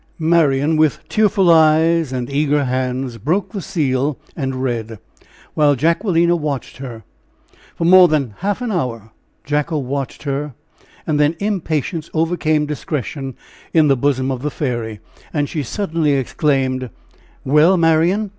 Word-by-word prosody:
Marian, 155 -2 +2
with 155 -1 +1
tearful 205 -4 +3
eyes 160 -1 +4
and 125 -2 -3
eager 145 +1 +1
hands, 130 -1 -2
broke 180 - -1
the 200 - -5
seal 140 -4 -1 0.2
and 130 -3 -3
read, 115 -3 -3 0.6
while 145 -2 +3
Jacquelina 170 - +2
watched 150 -8 -4
her. 120 -4 -8 0.7
For 165 - -2
more 180 +1 +8
than 140 -8 -1
half 205 +5 -2
an 240 - -2
hour 115 - -3 0.3
Jacko 150 +2 -1
watched 135 0 -4
her, 140 -1 -3 0.5
and 150 -2 0
then 150 +2 +3
impatience 165 -5 -2
overcame 155 -2 +1
discretion 140 -3 -4 0.4
in 155 -2 +5
the 135 - +5
bosom 130 0 0
of 130 -2 -4
the 150 - -2
fairy, 120 -7 -4 0.3
and 145 -1 +1
she 155 - -3
suddenly 160 - -1
exclaimed: 130 -2 0 0.6
"Well, 150 +7 +4
Marian! 170 +6 +2
150 Hz, 135 wpm, -18 LUFS, 130-165 Hz, 0.7 s, more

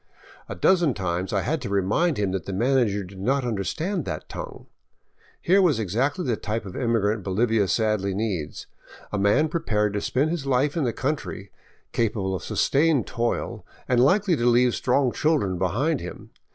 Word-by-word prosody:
A - - -4
dozen 175 -8 +3
times 90 -1 -2
I 100 - +1
had 150 +3 -1
to 120 - -5
remind 100 - +1
him 100 -2 0
that 95 -3 -4
the 100 - -3
manager 115 -2 +1
did 95 +1 -11
not 130 +6 0
understand 155 - -2
that 75 - -5
tongue. - - -8 0.7
Here 190 +3 +4
was 170 -9 +3
exactly 125 - -1
the 120 - +1
type 110 0 -3
of 95 - -8
immigrant 115 -4 0
Bolivia 105 +2 +1
sadly 105 -3 0
needs, 95 -8 -3 0.5
a 105 - -1
man 105 +11 +3
prepared 105 - 0
to 105 - -1
spend 145 +5 0
his 160 -5 -3
life 135 +2 +1
in 160 -5 0
the 120 - +1
country, 130 - -4 0.4
capable 100 -4 -1
of 90 - -3
sustained 145 -4 +2
toil, 115 -2 -2 0.2
and 125 -1 +3
likely 185 +5 +3
to 120 - -1
leave 120 0 +4
strong 125 0 +1
chil 155 +5 +2
dren 95 -8 -2
behind 130 - 0
him. - - -9
115 Hz, 180 wpm, -24 LUFS, 100-140 Hz, 0.7 s, Here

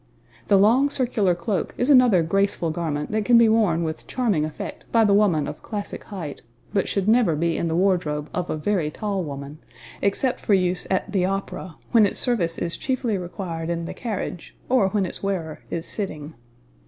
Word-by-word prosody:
The 200 - +5
long 235 +8 +4
circular 235 -9 +1
cloak 175 +2 -2
is 250 +4 +2
another 245 -10 +6
graceful 195 -1 +1
garment 155 -3 -3
that 215 0 0
can 240 +2 +5
be 230 -1 +6
worn 210 -7 +3
with 160 -1 -5
charming 210 -12 0
effect 155 - -7
by 225 -1 +4
the 200 - +4
woman 185 -8 +3
of 150 - -7
classic 205 -2 -6
height, 175 -9 -7 0.3
but 200 -3 +1
should 200 -1 -1
never 220 -7 +4
be 165 +1 0
in 170 - -1
the 160 - -1
wardrobe 170 -5 +1
of 180 -1 -2
a - - -1
very 170 -1 0
tall 200 +3 -3
woman 140 0 -7 0.4
except 250 +6 0
for 205 - +2
use 180 -1 0
at 190 +1 -1
the 190 -3 +2
opera, 190 -3 -4 0.2
when 225 -4 +6
its - - -3
service 185 -10 0
is 170 -1 -2
chiefly 255 -5 -1
required 175 -2 -5
in 170 -1 -2
the - - -5
carriage, 210 -7 -5
or 245 -7 +3
when 200 -1 0
its 175 - -6
wearer 180 -6 -3
is 165 0 -4
sitting. 160 -7 -5
190 Hz, 190 wpm, -23 LUFS, 165-215 Hz, 0.4 s, another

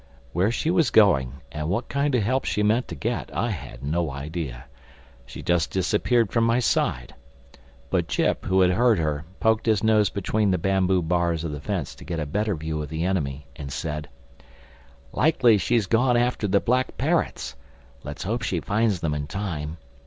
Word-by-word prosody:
Where 90 +5 +2
she 155 +7 0
was 165 -7 +3
going 70 - +3
and 75 +1 -3
what 100 +7 -1
kind 140 -1 0
of 115 - +2
help 130 +5 0
she 105 - 0
meant 110 +4 +2
to - - -6
get, 120 +2 -3
I 120 - 0
had 65 - -8
no 80 +3 0
idea. 70 -2 -5 0.6
She - - -9
just 85 -2 +1
disappeared 105 +3 +1
from 115 - +2
my 115 +1 +3
side. 60 - 0 0.8
But 85 -3 +1
Jip, - - 0
who 95 0 +3
had 90 -1 +5
heard 115 +3 +3
her, 75 -2 -1
poked 110 0 +2
his 110 -2 +2
nose 110 -2 +4
between 105 +1 0
the 95 - +2
bamboo 95 0 +1
bars 85 -1 0
of 80 - -3
the 75 -1 -6
fence 90 -4 -3
to - - -14
get 85 -2 -4
a 75 - -2
better 105 +7 -1
view 80 0 -3
of 75 - -6
the 80 +2 -2
enemy 75 -7 -2
and 70 -1 -7
said, 75 0 -4 1.0
"Likely 135 -5 +4
enough 105 - +2
she's 120 -4 +2
gone 120 +4 +3
after 120 -3 +1
the 100 +1 +3
Black 125 +4 0
Parrots. - - -1 0.5
Let's 75 +3 -6
hope 115 +5 -2
she 90 - -1
finds 105 -1 0
them 80 -3 0
in 75 -1 -3
time. 80 -3 -4
95 Hz, 190 wpm, -24 LUFS, 75-110 Hz, 1.0 s, had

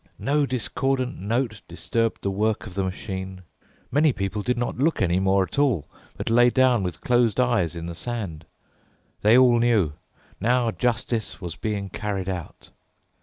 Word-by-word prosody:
No 145 +1 +1
discordant 130 +1 -1
note 110 +2 -1
disturbed 115 +6 -2
the 100 - 0
work 105 +3 0
of 105 - -9
the 95 +1 -1
machine. 95 0 -5 0.5
Many 145 +3 +4
people 100 0 -3
did 125 +3 -1
not 120 0 -2
look 160 +4 +2
any 90 -1 +2
more 95 0 +3
at 95 - -4
all, 130 - +2 0.3
but - - -3
lay 120 +1 +6
down 130 -3 +3
with 90 -4 -4
closed 120 -2 +2
eyes 120 -10 +2
in 85 0 -5
the 85 - -5
sand. 90 -5 -5 0.7
They 110 +4 +6
all 125 -2 +6
knew: 110 -10 +2 0.5
now 120 +2 +2
justice 120 -1 -2
was 90 -3 -6
being 100 -1 -3
carried 100 -3 -3
out. 90 -3 -7
110 Hz, 165 wpm, -24 LUFS, 95-125 Hz, 0.7 s, lay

